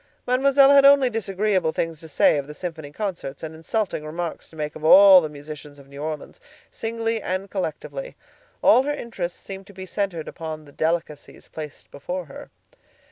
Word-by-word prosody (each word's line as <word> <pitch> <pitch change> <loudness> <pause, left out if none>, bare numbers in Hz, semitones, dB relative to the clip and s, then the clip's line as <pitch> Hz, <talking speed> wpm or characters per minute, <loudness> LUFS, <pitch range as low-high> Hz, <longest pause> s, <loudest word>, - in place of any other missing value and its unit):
Mademoiselle 275 +2 +5
had 280 -1 +7
only 275 -2 +6
disagreeable 195 -5 0
things 165 -1 -3
to 160 - -10
say 155 - +4
of 140 - -6
the 150 - -9
symphony 160 -4 -6
concerts, 170 -8 -5
and 160 0 -5
insulting 165 +1 -2
remarks 165 +2 -5
to - - -17
make 150 -1 -4
of 155 - -10
all 190 +3 +9
the 155 - -4
musicians 150 0 -10
of 140 -1 -16
New 140 +1 -10
Orleans, 155 - -6 0.3
singly 225 0 -2
and 185 +1 -3
collectively. 205 - -5 0.5
All 255 - +7
her 290 +2 -1
interest 190 -10 -5
seemed 195 0 -9
to 200 - -14
be 190 0 -8
centered 185 -4 -3
upon 155 -1 -7
the 145 - -15
delicacies 160 -1 -3
placed 155 -2 -9
before 180 +5 -5
her. 140 - -11
175 Hz, 180 wpm, -23 LUFS, 155-215 Hz, 0.5 s, all